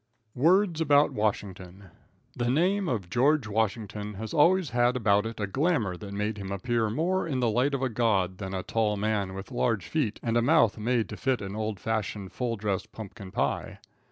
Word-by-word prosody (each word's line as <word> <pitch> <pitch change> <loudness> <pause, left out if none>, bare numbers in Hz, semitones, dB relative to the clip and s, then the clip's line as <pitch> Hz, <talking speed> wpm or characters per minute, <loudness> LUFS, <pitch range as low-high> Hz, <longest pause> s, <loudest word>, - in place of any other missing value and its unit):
Words 170 +4 +3
About 145 -1 +4
Washington. 100 -3 -3 0.4
The 120 0 -1
name 180 +7 +2
of 105 -7 -2
George 135 - +2
Washington 105 -1 -2
has 110 +2 -6
always 170 +2 +4
had 120 +1 +2
about 105 -2 +2
it 115 -1 -8
a 105 - 0
glamour 120 - 0
that 100 +2 -9
made 105 +1 -2
him 100 -1 -6
appear 110 +3 0
more 170 - 0
in 135 -5 -1
the 120 -3 +2
light 130 +5 +1
of 135 - -3
a 130 - +1
god 100 -5 0
than 95 -1 -4
a 95 - -3
tall 105 0 0
man 100 -2 -1
with 95 +6 -8
large 115 -6 0
feet 115 - -1
and 115 -1 +1
a - - +4
mouth 120 -5 +3
made 115 +1 0
to 105 - -7
fit 130 -2 0
an 100 -1 -6
old 110 -2 -3
fashioned, 105 -3 -3
full 120 -2 -2
dress 100 -3 -2
pumpkin 100 -2 -9
pie. - - -2
110 Hz, 195 wpm, -28 LUFS, 100-130 Hz, 0.4 s, About